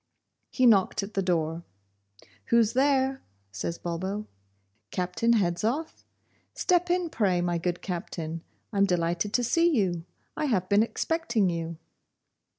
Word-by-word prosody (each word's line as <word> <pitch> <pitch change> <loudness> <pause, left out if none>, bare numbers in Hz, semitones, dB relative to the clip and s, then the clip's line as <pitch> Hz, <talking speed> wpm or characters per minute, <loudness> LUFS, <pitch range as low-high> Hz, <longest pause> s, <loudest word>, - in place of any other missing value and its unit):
He 255 - +1
knocked 200 -3 +4
at 200 +2 -7
the 195 - +1
door. 165 -2 -1 0.8
'Who's 230 -2 +3
there?' 265 0 +2 0.3
says 105 - -4
Bulbo. 190 +5 -3 0.6
'Captain 180 +6 0
Hedzoff? 220 - -1 0.5
Step 355 -1 +2
in, 355 0 +1
pray, 190 -5 +1
my 175 -1 0
good 175 +1 -2
Captain; 165 -2 -4 0.3
I'm 200 0 +4
delighted 175 +1 0
to 245 - +2
see 335 +8 +3
you; 190 - 0 0.3
I 305 - -1
have 195 -10 +1
been 200 +1 +4
expecting 230 - 0
you. 165 -1 -4
195 Hz, 130 wpm, -27 LUFS, 175-245 Hz, 0.8 s, knocked